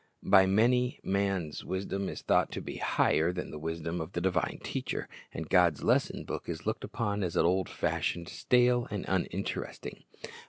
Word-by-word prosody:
By 95 -1 +6
many, 120 +5 +3
man's 95 -5 -1
wisdom 95 +1 -3
is - - -7
thought - - +2
to - - -3
be - - -6
higher 80 +3 +2
than 90 0 -5
the 75 - -7
wisdom 80 +2 -3
of 80 +4 -7
the 85 - -2
divine 90 -2 0
Teacher, - - -3 0.2
and 80 - -5
God's 85 -4 +3
lesson - - +2
book - - -5
is 85 -1 -5
looked 110 +1 -2
upon 105 -3 -2
as 90 -3 -2
old 90 +1 +2
fashioned, 85 -1 -1
stale, 125 +2 +2
and 105 -2 -4
uninteresting. 95 +1 -3
95 Hz, 165 wpm, -30 LUFS, 85-100 Hz, 0.2 s, By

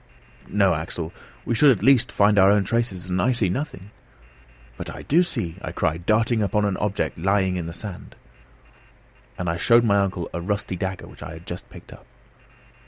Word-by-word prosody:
"No, 100 -3 +3
Axel, 80 +1 -4 0.3
we - - 0
should 140 +6 +5
at 120 -7 +2
least 135 -3 +4
find 100 0 +4
our 95 +1 +7
own 100 0 +4
traces 95 -4 -1
and 90 0 +1
I 130 - +2
see 110 -6 +1
nothing 105 - -5 0.4
" - - -27
"But - - -7
I - - -8
do 165 +5 +3
see," 110 - -2
I - - -5
cried, 85 +3 -2
darting 110 +1 +2
upon 105 0 +1
an 100 -2 0
object 100 -4 -2
lying 95 0 +1
on 85 - -5
the - - -5
sand. 95 +1 -8 1.2
And 90 - -3
I 85 0 0
showed 115 +5 +5
my 100 -3 +3
uncle 95 -3 -1
a 85 - -3
rusty 100 +1 -2
dagger 95 +1 -4
which - - -14
I - - -7
had 80 +1 -11
just 90 -1 -7
picked - - -13
up. - - -17
95 Hz, 200 wpm, -23 LUFS, 90-110 Hz, 1.2 s, our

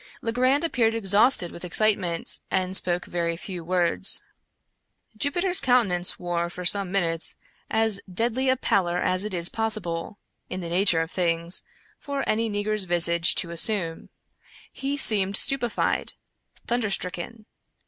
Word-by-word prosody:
Legrand 255 +5 +1
appeared 230 -8 0
exhausted 205 -2 +2
with 170 - -9
excitement, 180 -2 0
and 185 0 -2
spoke 175 -1 +1
very 170 -1 -3
few 180 -1 -7
words. 175 0 +3 0.9
Jupiter's 350 - 0
countenance 215 - +2
wore, 170 -1 -3
for 180 +1 -8
some 195 0 +2
minutes, 170 -4 -2 0.3
as 220 -2 0
deadly 240 +6 -1
a 260 - +2
pallor 180 -7 0
as 185 +1 0
it 210 - -5
is 175 -2 +4
possible, 205 -4 -3 0.3
in 185 - -5
the 170 -2 -6
nature 175 -1 +3
of 165 +1 -5
things, 170 -1 -1 0.4
for 280 -1 -5
any 225 +1 0
negro's 205 0 -1
visage 170 -1 +4
to 170 - -1
assume. 170 -1 +1 0.6
He 275 +1 -3
seemed 200 -7 +3
stupefied 245 -4 +1 0.3
— - - -30
thunderstricken. 215 -2 -2
195 Hz, 135 wpm, -24 LUFS, 175-225 Hz, 0.9 s, is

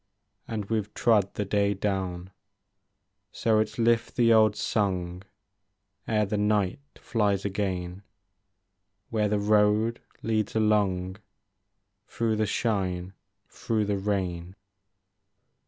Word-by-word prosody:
And 110 -3 -3
we 110 +2 0
've 105 0 -7
trod 105 -5 +2
the 105 - -2
day 100 0 +1
down. 95 -2 -3 1.0
So 110 -1 +2
it 110 0 +1
's 110 - -14
lift 115 -1 +1
the 115 -2 +4
old 110 -2 +5
song 90 -5 -1 0.9
Ere 105 -1 +2
the 105 +1 -2
night 105 -1 +1 0.2
flies 100 -4 0
again. 95 -2 -3 1.1
Where 105 -2 +1
the 105 - +1
road 105 +2 +2 0.2
leads 110 -2 -1
along 100 -4 +1 0.9
Through 115 -2 -1
the 110 0 +1
shine, 95 -5 -1 0.3
through 110 -2 -2
the 100 -1 -1
rain. 95 -3 -2
105 Hz, 115 wpm, -27 LUFS, 95-110 Hz, 1.1 s, old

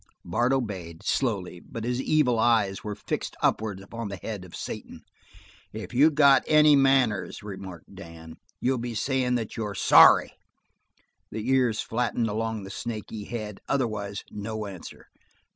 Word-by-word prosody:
Bart 120 +9 +1
obeyed, 95 -11 -3
slowly, 100 -9 -1
but 115 +5 -8
his 125 +2 -1
evil 135 -6 +2
eyes 110 -5 +2
were 105 -1 -4
fixed 105 - -4
upwards 105 -3 0
upon 115 +2 -6
the 100 - -5
head 100 0 -6
of 90 - -11
Satan. - - -7 0.7
"If 110 +3 -7
you 140 +6 +6
got 140 -3 +5
any 150 -1 +6
manners," 130 -9 +2
remarked 95 -4 -9
Dan, 80 -4 -11 0.2
"you'll 130 0 0
be 120 -1 -5
sayin' 130 +1 0
that 115 -3 -3
you're 105 -3 -3
sorry." - - +7 1.0
The 110 +1 -5
ears 125 -4 +2
flattened 115 -1 -1
along 110 0 -3
the 95 - -8
snaky 110 -1 -6
head; 105 -4 -6
otherwise 105 -7 -2
no 110 +1 -5
answer. 95 -4 -10
110 Hz, 145 wpm, -26 LUFS, 100-125 Hz, 1.0 s, sorry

